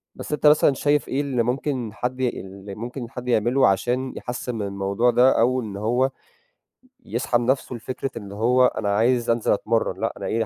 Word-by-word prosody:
بس - - -8
أنت 150 - +2
مثلًا 150 -1 +5
شايف 145 +2 +1
إيه 135 +2 0
اللي 130 -5 0
ممكن 125 -2 -2
حد 125 +4 -3
اللي 100 -5 -4
ممكن 120 +2 -6
حد 125 -1 -8
يعمله 125 +3 +3
عشان 125 +7 0
يحسِّن 125 0 -5
من 110 - -3
الموضوع 100 +5 +1
ده، 125 +1 +4
أو 125 +2 +2
إن 105 -4 -6
هو 120 +6 +1 1.0
يسحب 120 +1 0
نَفْسه 130 +1 0
لفكرة 130 +3 -5
إن 100 -3 -8
هو 125 +5 +3
أنا 100 -4 0
عايز 120 +2 +2
أنزل 115 -1 +1
أتمرَّن 115 +2 -1
لأ - - -1
أنا - - -6
إيه، 115 0 0
120 Hz, 185 wpm, -23 LUFS, 110-130 Hz, 1.0 s, مثلًا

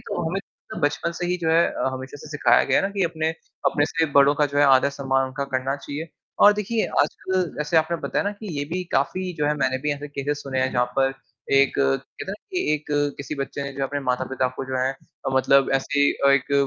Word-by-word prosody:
तो 160 - -2
हमें 195 +3 -2 0.4
बचपन 145 +3 0
से 175 - -3
ही 180 +1 0
जो 160 - +2
है 165 +1 +5
अ, - - -1
हमेशा 130 +2 -7
से 150 - -11
सिखाया 150 -1 +4
गया - - +3
है - - +1
ना - - -3
कि 195 - +3
अपने 160 -1 -1 0.4
अपने 145 - +2
से 165 0 0
बड़ों 140 +1 +6
का 150 0 +2
जो 145 0 -2
है 145 - +6
आदर-सम्मान 135 -1 +3
उनका 135 +2 -4
करना 135 +2 -1
चाहिए। 145 +3 -6 0.4
और 205 - +9
देखिए, 210 +2 -1 0.2
आजकल 185 +5 -1 0.2
जैसे 150 +3 0
आपने 160 +2 +3
बताया - - -1
ना 205 - 0
कि, 210 +1 -10
ये 145 - -1
भी 185 +1 -1
काफ़ी 180 +7 0
जो 150 - +1
है 150 - +2
मैंने 130 -2 0
भी 150 - +1
ऐसे 145 +1 -6
केसेज़ 145 +1 -3
सुने 135 -2 -3
हैं, 130 0 +1
जहाँ 125 0 +2
पर 135 0 +3 0.4
एक 140 0 +5
कहते 70 0 -1
हैं - - -4
ना 195 - -3 0.2
कि 360 - 0
एक 150 0 -6
अ, 145 0 +2
किसी 140 +2 -5
बच्चे 140 0 -4
ने 140 0 -5
जो 135 0 -5
अपने 145 +1 -3
माता-पिता 130 +1 -1
को - - -4
जो 130 0 -3
है 135 +1 0 0.4
मतलब 135 +1 +4
ऐसे 145 +1 +2
अ, 140 - +2
एक 140 0 +2
145 Hz, 240 wpm, -23 LUFS, 135-160 Hz, 0.4 s, और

